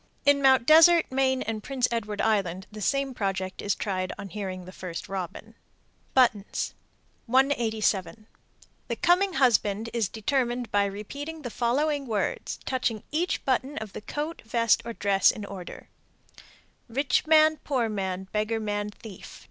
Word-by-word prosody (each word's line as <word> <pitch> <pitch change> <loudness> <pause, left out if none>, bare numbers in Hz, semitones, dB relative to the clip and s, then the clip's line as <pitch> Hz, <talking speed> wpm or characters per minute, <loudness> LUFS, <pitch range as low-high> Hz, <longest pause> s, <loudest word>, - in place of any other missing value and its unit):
_ - - -37 0.2
In 285 0 +5
Mt. 265 -3 +5
Desert, 325 +2 +7
Maine, 260 -1 +1
and 220 -1 -4
Prince 260 +1 0
Edward 215 -3 -2
Island 190 -4 0
the 215 0 -9
same 275 +4 0
project 190 -4 -3
is 205 - 0
tried 185 -2 -2
on 200 - -7
hearing 185 -2 -5
the 185 - -10
first 180 -2 -7
robin. 195 +3 -6 0.6
BUTTONS. 235 -6 +2 0.5
187. 225 -5 +1 0.6
The - - -2
coming 360 +2 +3
husband 230 -5 +2
is 225 -5 0
determined 240 0 -1
by 205 0 +3
repeating 285 +11 -6
the 245 - -5
following 275 +5 0
words, 215 -3 -2
touching 245 -5 -1
each 335 +4 -1
button 265 +2 0
of 220 -2 -6
the - - -7
coat, 300 +8 -5
vest, 230 0 +2
or 235 - -4
dress 200 -3 +3
in 210 - -3
order: 190 -3 -9 1.0
Rich 275 +5 +1
man, 310 0 +5
poor 260 -7 -1
man, 190 -3 -3
beggar 215 +1 0
man, 205 -1 -2
thief. 210 -2 -11
225 Hz, 150 wpm, -27 LUFS, 205-270 Hz, 1.0 s, Desert